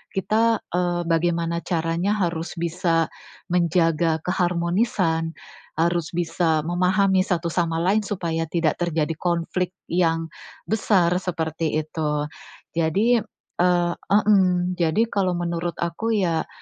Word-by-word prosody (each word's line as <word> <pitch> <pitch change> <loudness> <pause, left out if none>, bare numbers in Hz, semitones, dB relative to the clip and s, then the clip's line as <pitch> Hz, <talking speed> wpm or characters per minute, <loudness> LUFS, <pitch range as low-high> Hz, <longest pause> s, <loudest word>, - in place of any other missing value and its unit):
kita, 225 +4 +2 0.2
eee, 175 -1 0
bagaimana 170 0 0
caranya 170 +4 0
harus 170 -4 -2
bisa 170 -1 0 0.5
menjaga 165 -2 +2
keharmonisan, 175 -2 0 0.4
harus 170 0 +1
bisa 165 -2 0
memahami 185 +2 +2
satu 175 -3 -1
sama 165 -2 0
lain 190 +6 +2
supaya 165 -5 -2
tidak 165 -2 0
terjadi 165 -2 0
konflik 175 +1 -1
yang 165 -2 +1 0.4
besar, 200 -5 +2
seperti 160 -3 -2
itu. 150 -1 -2 0.5
Jadi, 195 +9 +2 0.4
eee 175 -1 +3 0.2
hmm, 185 -3 +3
jadi 170 +5 +2
kalau 185 -3 +1
menurut 170 -1 -2
aku 215 +7 -1
ya, 170 -5 0
175 Hz, 110 wpm, -23 LUFS, 165-185 Hz, 0.5 s, eee